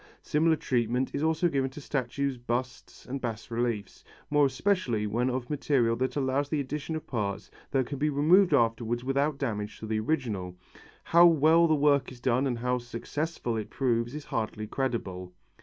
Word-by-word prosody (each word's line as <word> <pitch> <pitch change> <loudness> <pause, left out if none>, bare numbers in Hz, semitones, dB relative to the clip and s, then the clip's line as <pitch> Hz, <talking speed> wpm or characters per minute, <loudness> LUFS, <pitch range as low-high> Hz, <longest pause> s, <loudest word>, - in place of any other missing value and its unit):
Similar 160 +2 +2
treatment 125 -2 -1
is 140 - -2
also 160 +2 +2
given 135 -4 0
to 135 - -10
statues, 140 0 -2
busts 120 +1 -4
and 135 +1 -5
bas 115 -1 -5
reliefs, 115 -4 -2 0.3
more 145 -1 +5
especially 130 - 0
when 120 +5 0
of 125 -1 -3
material 135 -5 +1
that 130 +2 -1
allows 140 0 0
the 155 - 0
addition 150 +3 -3
of 155 - -5
parts 100 -5 -3 0.2
that 135 -2 +1
can 140 +2 -6
be 150 +1 +2
removed 165 +7 +4
afterwards 120 -2 +1
without 140 +2 0
damage 105 -6 -3
to - - -8
the 110 0 -1
original. 110 - -2 0.5
How 170 +1 +6
well 165 +1 +5
the 155 - +3
work 140 -2 +2
is 125 - -12
done 130 +2 +1
and 120 -3 -1
how 125 +1 0
successful 120 +2 -4
it 110 - -4
proves 120 -1 0
is 150 - -7
hardly 110 -1 -3
credible. 100 -8 -3
130 Hz, 175 wpm, -28 LUFS, 115-145 Hz, 0.5 s, How